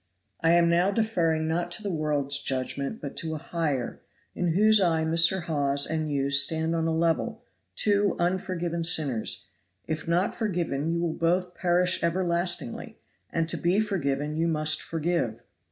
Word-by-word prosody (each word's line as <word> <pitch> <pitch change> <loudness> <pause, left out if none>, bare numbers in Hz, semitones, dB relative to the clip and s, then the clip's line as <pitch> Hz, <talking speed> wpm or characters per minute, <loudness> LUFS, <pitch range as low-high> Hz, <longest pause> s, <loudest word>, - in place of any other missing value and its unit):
I 165 +1 +3
am 170 0 +5
now 175 +3 +3
deferring 175 -7 0
not 170 +2 -1
to 215 - -6
the 200 - -2
world's 145 -3 -1
judgment 140 - -3
but 140 - -7
to 160 -1 -3
a - - -3
higher, 150 -5 -3 0.3
in 175 -2 0
whose 215 +3 +5
eye 165 -3 +2
Mr. 170 +3 +3
Hawes 140 -4 0
and 155 -1 -2
you 140 -1 0
stand 160 +3 +3
on 165 0 0
a - - +1
level 165 0 0 0.3
two 205 -2 +2
unforgiven 175 -1 -1
sinners; 150 -9 +1 0.4
if 155 0 -4
not 175 +3 +1
forgiven 170 - -2
you 170 0 0
will 170 -2 -1
both 180 +2 0
perish 180 +1 +1
everlastingly, 170 -5 -1 0.3
and 165 -1 -1
to - - +1
be 180 +4 +2
forgiven 150 -8 -1
you 165 +1 +1
must 155 -2 +2
forgive. 165 -8 -2
165 Hz, 160 wpm, -27 LUFS, 155-180 Hz, 0.4 s, am